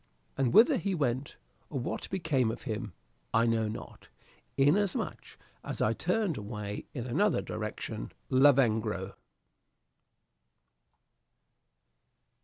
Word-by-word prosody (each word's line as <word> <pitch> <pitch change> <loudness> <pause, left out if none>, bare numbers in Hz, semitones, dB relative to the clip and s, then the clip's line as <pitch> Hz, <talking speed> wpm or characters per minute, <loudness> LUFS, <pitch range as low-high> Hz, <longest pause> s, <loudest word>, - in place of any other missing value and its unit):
And 135 -3 +1
whither 245 +6 +7
he 200 -4 -1
went, 135 -2 -1 0.3
or 140 - -3
what 120 - -4
became 150 -10 +1
of 110 - -5
him, 110 -5 -4 0.4
I 115 +1 +5
know 115 -1 +2
not, 105 - -8 0.5
inasmuch 180 +8 +1 0.3
as - - -5
I 110 - +2
turned 180 - 0
away 105 -1 -5
in 125 -3 -3
another 170 - +2
direction. 110 0 -5 0.2
"Lavengro." 110 -8 +3
125 Hz, 100 wpm, -30 LUFS, 110-155 Hz, 0.5 s, whither